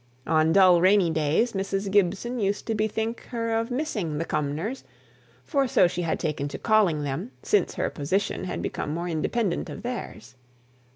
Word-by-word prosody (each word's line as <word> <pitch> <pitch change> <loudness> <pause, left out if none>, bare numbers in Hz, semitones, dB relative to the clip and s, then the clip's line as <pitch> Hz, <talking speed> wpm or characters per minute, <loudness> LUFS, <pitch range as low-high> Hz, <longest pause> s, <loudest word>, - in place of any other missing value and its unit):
On 160 0 +3
dull 185 -2 +6
rainy 185 -2 +4
days, 160 +10 +1
Mrs. 195 0 -2
Gibson 205 +5 +1
used 200 -1 -1
to 225 - -1
bethink 220 +2 -2
her 230 -2 -3
of 225 +1 0
missing 220 - -2
"the 165 - -2
Cumnors," 155 - -2 0.6
for 275 -4 +1
so 240 -8 +4
she 175 - -3
had 165 -2 -1
taken 150 -3 -2
to 140 - -6
calling 200 -9 +2
them 145 - -3
since 420 - +1
her - - -1
position 185 +7 -1
had - - -4
become 150 - -3
more 170 +1 -3
independent 175 +4 -1
of - - -8
theirs. 180 - -6
195 Hz, 170 wpm, -26 LUFS, 160-225 Hz, 0.6 s, dull